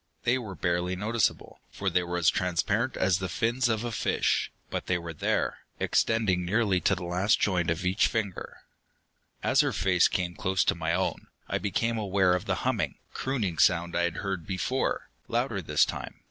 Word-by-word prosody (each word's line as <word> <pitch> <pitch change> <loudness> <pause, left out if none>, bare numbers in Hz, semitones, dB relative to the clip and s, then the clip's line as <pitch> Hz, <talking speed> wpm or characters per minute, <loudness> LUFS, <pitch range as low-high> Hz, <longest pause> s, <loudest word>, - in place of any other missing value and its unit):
They 125 +2 +2
were 105 -6 -7
barely 90 +1 0
noticeable, 110 +3 -1
for 100 - -5
they 90 -1 +3
were 90 0 -3
as 85 -2 +4
transparent 100 +7 0
as 95 -1 +2
the 95 -1 -3
fins 120 +7 +1
of 110 0 0
a 120 - -3
fish, - - 0 0.2
but - - -3
they 90 - +2
were 85 -1 -6
there, 75 - -1 0.2
extending 105 -6 +2
nearly 100 0 +2
to - - +3
the 90 - -7
last 90 +4 +2
joint 90 -4 +1
of 85 +3 -1
each 90 +1 +3
finger. 105 -5 -4 0.8
As - - +4
her - - 0
face 90 -1 +3
came 90 -1 -2
close 95 0 +1
to - - +2
my 80 -1 -2
own, 95 +2 -1 0.2
I - - -1
became 115 +3 0
aware 95 -3 +2
of 90 - -1
the - - 0
humming, - - 0 0.2
crooning 110 -11 -2
sound 85 -1 +3
I 85 - +2
had 85 -1 -3
heard 95 -4 -3
before, 125 +8 -1 0.2
louder - - -1
this - - +3
time. - - -6
95 Hz, 190 wpm, -28 LUFS, 90-110 Hz, 0.8 s, as